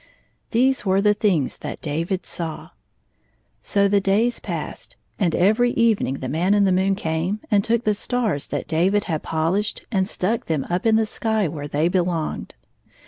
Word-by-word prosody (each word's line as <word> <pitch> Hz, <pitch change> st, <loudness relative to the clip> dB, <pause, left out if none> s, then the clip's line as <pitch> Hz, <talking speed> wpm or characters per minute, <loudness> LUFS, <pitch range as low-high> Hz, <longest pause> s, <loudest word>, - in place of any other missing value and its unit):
These 260 Hz, +3 st, +2 dB
were 190 Hz, -1 st, +2 dB
the 210 Hz, +1 st, +4 dB
things 190 Hz, -, 0 dB
that -, -, -6 dB
David 165 Hz, +5 st, -2 dB
saw. 165 Hz, -3 st, -5 dB, 0.9 s
So 200 Hz, 0 st, +2 dB
the 200 Hz, 0 st, +3 dB
days 215 Hz, +5 st, +1 dB
passed, -, -, -6 dB, 0.2 s
and 175 Hz, -6 st, +1 dB
every 220 Hz, +7 st, +3 dB
evening 225 Hz, -, +2 dB
the 130 Hz, -, -3 dB
Man 175 Hz, +9 st, +1 dB
in 205 Hz, -, +4 dB
the 195 Hz, -, +3 dB
moon 190 Hz, +1 st, +2 dB
came 170 Hz, +3 st, -2 dB
and 200 Hz, -1 st, +4 dB
took 235 Hz, +1 st, +1 dB
the 215 Hz, -, +2 dB
stars 210 Hz, -, -1 dB
that -, -, -4 dB
David 190 Hz, +6 st, +2 dB
had 160 Hz, -4 st, -2 dB
polished 170 Hz, +7 st, -1 dB
and 190 Hz, -4 st, +1 dB
stuck 215 Hz, +3 st, -2 dB
them 155 Hz, -4 st, -1 dB
up 180 Hz, +5 st, 0 dB
in 220 Hz, -, +4 dB
the 220 Hz, 0 st, +3 dB
sky 220 Hz, -2 st, 0 dB
where 145 Hz, -2 st, -5 dB
they 150 Hz, +3 st, +1 dB
belonged. 175 Hz, -3 st, -1 dB
195 Hz, 175 wpm, -22 LUFS, 165-215 Hz, 0.9 s, the